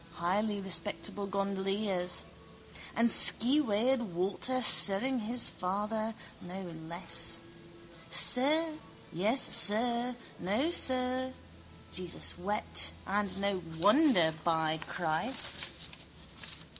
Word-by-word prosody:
Highly 200 +5 -2
respectable 200 +1 -4
gondoliers! 195 -1 -2 0.7
And 230 - +2
skeweyed 245 +1 +4
Walter 195 +6 -3
sirring 245 +2 +5
his 235 +3 -1
father, 215 +4 -5 0.3
no 185 +2 -9 0.2
less! 170 +2 -2 0.7
Sir. 310 +5 +3 0.3
Yes, 215 +10 +2
sir. 235 +3 +2 0.2
No, 215 - -2
sir. 255 -3 0 0.6
Jesus 180 -2 -2
wept: 85 - -1
and 200 0 -3
no 200 -2 -2 0.2
wonder, 205 - +3
by 160 -1 -1
Christ! 175 +9 0
205 Hz, 80 wpm, -30 LUFS, 185-250 Hz, 0.7 s, sirring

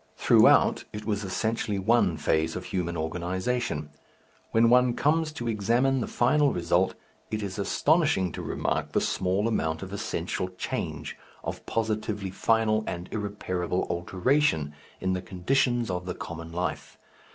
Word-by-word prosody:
Throughout - - +5
it 105 0 -7
was 105 -1 -1
essentially 105 +2 -1
one 95 -4 +2
phase 80 +2 +1
of - - -5
human 85 -2 -2
organization. 90 +1 -2 0.6
When 115 +1 +4
one 125 -1 +5
comes 155 +2 +2
to 120 -6 -5
examine 120 +5 +2
the - - -2
final 140 +3 +3
result, 85 +2 +1 0.3
it 110 -1 -2
is 100 +1 -5
astonishing 145 - +2
to - - -6
remark - - -2
the - - +3
small 95 +3 0
amount 80 -8 -1
of 95 +1 -8
essential 95 -3 -3
change, - - -4 0.3
of - - -5
positively 110 -3 -2
final 110 +2 +2
and 85 0 -5
irreparable 95 -4 -2
alteration, 90 - +1 0.3
in 95 0 0
the 90 - -2
conditions 120 +4 0
of 90 0 -4
the 90 - -3
common 80 0 -7
life. 90 +2 -4
100 Hz, 140 wpm, -27 LUFS, 90-115 Hz, 0.6 s, Throughout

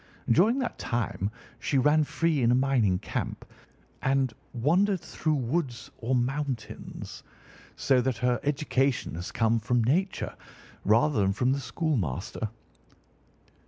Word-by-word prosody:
During 210 - +5
that 260 -3 -3
time 115 -4 -1 0.3
she 135 - 0
ran 150 +4 +4
free 165 -2 +1
in 115 - +4
a 120 - +5
mining 125 -8 +3
camp - - -4 0.6
and 135 -2 +1 0.2
wandered 180 - +2
through 155 -1 -1
woods 130 -1 -2
or 125 +3 0
mountains, 130 -1 -3 0.5
so 130 -2 +3
that 130 -1 -1
her 125 0 +1
education 140 -2 0
has 85 +2 -5
come 115 0 +2
from 120 +2 +1
Nature 180 - 0 0.5
rather 115 +5 +4
than 95 0 +2
from 125 +5 +1
the 140 - -1
schoolmaster. 110 - -2
130 Hz, 125 wpm, -28 LUFS, 115-150 Hz, 0.6 s, During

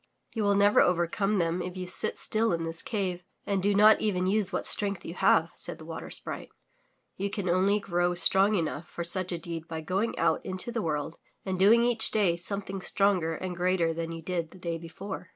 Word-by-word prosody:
"You 225 - -2
will 200 0 +3
never 205 +1 +4
overcome 180 +4 +1
them 170 0 0
if 180 +1 -6
you 185 - -4
sit 180 - 0
still 220 -2 +1
in 165 -1 -2
this 165 0 -3
cave 185 -5 -3 0.2
and 200 -2 0
do 200 +1 +1
not 215 +2 +6
even 185 -4 0
use 200 0 +1
what - - -2
strength 200 -2 +1
you 165 - -6
have," 165 -2 +3
said - - -4
the 160 - -12
Water 165 0 -7
Sprite. - - -5 0.7
''You 200 +1 -1
can 200 -3 -3
only 190 +4 +2
grow 175 -2 0
strong 195 +4 +4
enough 165 -2 -2
for 170 - -5
such 185 +2 -1
a 175 - -2
deed 165 -1 -7
by 160 -1 -5
going 190 +8 -2
out - - +1
into 185 +5 -5
the 235 -1 -2
world 155 -2 -3 0.3
and 190 -2 -3
doing 225 +5 +6
each 240 -2 +4
day 200 -6 +2
something 195 +2 -4
stronger 185 -5 +1
and 185 +2 -5
greater 175 -2 +1
than 165 0 -4
you 165 0 -7
did 170 -2 -3
the 185 - -15
day 170 -2 -4
before." 180 +2 -8
185 Hz, 215 wpm, -28 LUFS, 170-200 Hz, 0.7 s, not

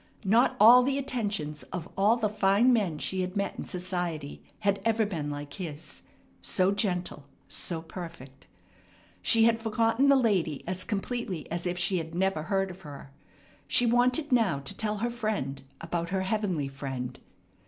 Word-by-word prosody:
Not 225 +6 +4
all 235 +4 +9
the 270 +2 0
attentions 205 - -2
of 175 -3 -4
all 205 +4 +4
the 230 -3 0
fine 210 +4 +3
men 195 -9 +1
she 185 +5 -2
had 185 +1 -4
met 200 - -2
in - - -4
society 175 -5 -4 0.2
had 200 -1 +1
ever 225 -1 +2
been 160 -8 -3
like 145 0 -6
his, 165 -5 -7 0.4
so 185 0 +2
gentle, 180 -7 -2 0.2
so 165 -2 -3
perfect. 165 -7 -10 0.7
She 225 -2 +5
had 230 0 +4
forgotten 225 +4 +2
the 280 - +7
lady 190 - +1
as 185 0 -2
completely 205 - -3
as 170 +1 -2
if 175 0 -2
she 185 0 +1
had 160 0 -7
never 190 -3 +1
heard 195 +4 -1
of 185 +1 -13
her. 140 -3 -10 0.6
She 245 - +4
wanted 250 +5 +2
now 225 - +3
to 135 - -3
tell 210 -1 -2
her 235 +4 -1
friend 215 - -3 0.2
about 170 0 -3
her 190 0 0
heavenly 190 -7 -1
Friend. 135 -2 -5
190 Hz, 165 wpm, -28 LUFS, 165-225 Hz, 0.7 s, all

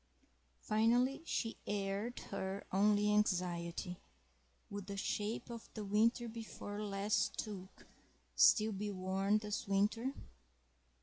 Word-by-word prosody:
Finally, 240 +6 +3
she 225 -1 -1
aired 205 +3 -2
her 190 +1 -3
only 210 +2 +4
anxiety—would 180 +1 -3
the 200 -1 -5
shape 210 +2 -2
of 230 -1 -8
the 215 -2 -4
winter 230 +4 +3
before 220 -2 -6
last 205 0 0
toque 195 -3 -6 0.5
still 220 0 +6
be 205 +1 -3
worn 195 +2 +1
this 210 -1 -3
winter? 210 +6 +1
210 Hz, 105 wpm, -36 LUFS, 195-220 Hz, 0.5 s, still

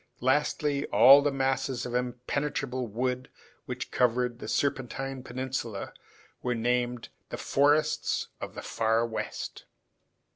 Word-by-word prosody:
Lastly, 145 +2 +1
all 130 +7 +8
the 145 0 +1
masses 135 -1 -1
of 125 - -5
impenetrable 125 +1 -2
wood 125 +4 -2 0.4
which - - -5
covered 125 -1 +1
the - - -7
Serpentine 135 -1 -1
Peninsula 125 -4 -4 0.5
were 125 -1 0
named 120 +1 0 0.2
the - - -5
forests 145 +2 +2
of - - -6
the - - -6
Far 115 +1 +1
West. 115 -1 -5
125 Hz, 115 wpm, -29 LUFS, 120-135 Hz, 0.5 s, all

